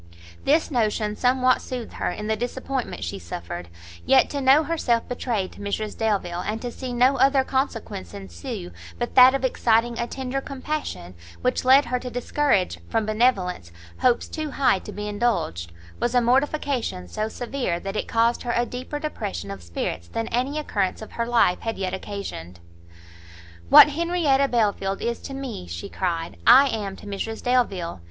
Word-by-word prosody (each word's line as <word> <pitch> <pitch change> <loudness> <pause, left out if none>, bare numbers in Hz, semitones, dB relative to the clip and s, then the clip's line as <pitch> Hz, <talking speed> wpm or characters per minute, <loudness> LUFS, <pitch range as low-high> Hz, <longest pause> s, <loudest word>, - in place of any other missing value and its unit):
This 310 +3 +3
notion 215 -4 0
somewhat 255 +2 +3
soothed 250 -3 -6
her - - -2
in 210 - -5
the 220 0 +1
disappointment 245 - -4
she 85 +3 -4
suffered; 85 0 -7 0.4
yet 265 -1 +4
to 285 - -2
know 270 +4 +6
herself 280 -8 0
betrayed 230 -6 -2
to - - -15
Mrs 205 +1 -3
Delvile, 195 -6 -1
and 215 +3 -3
to 245 - -3
see 255 +1 -6
no 250 +3 +3
other 270 0 +4
consequence 245 - -3
ensue 90 -2 -7 0.3
but 240 - -3
that 255 +1 +8
of 270 -1 -1
exciting 235 -1 +2
a 235 - -1
tender 265 +1 -3
compassion, 275 - -5 0.3
which 250 0 +1
led 265 +3 +6
her 250 +1 -1
to 250 - -6
discourage, 245 -4 0
from 225 -2 0
benevolence, 210 - +1 0.3
hopes 245 -2 +2
too 310 -2 -4
high 270 -8 +2
to - - -9
be 210 0 -5
indulged, 205 - -1 0.3
was 240 +1 0
a - - +7
mortification 260 - 0
so 215 - -3
severe, 245 -8 -3
that 195 +3 -5
it - - -2
caused 230 +1 +2
her 240 -1 -2
a 240 - +2
deeper 255 +4 -5
depression 210 - -4
of 100 -1 -7
spirits 85 0 -4
than 225 - -3
any 255 +5 -1
occurrence 205 -9 -1
of - - -11
her 235 0 -2
life 230 -7 +3
had 225 0 -4
yet 190 -1 -2
occasioned. 190 - -6 1.1
"What - - +10
Henrietta 305 -3 +2
Belfield 205 -5 0
is 235 0 -2
to 270 - -7
me," 260 - -6
she 85 0 -6
cried, 170 -3 -3
"I 270 +4 +8
am 205 -5 -3
to - - -13
Mrs 205 +2 -5
Delvile! 200 - 0
235 Hz, 175 wpm, -24 LUFS, 195-260 Hz, 1.1 s, What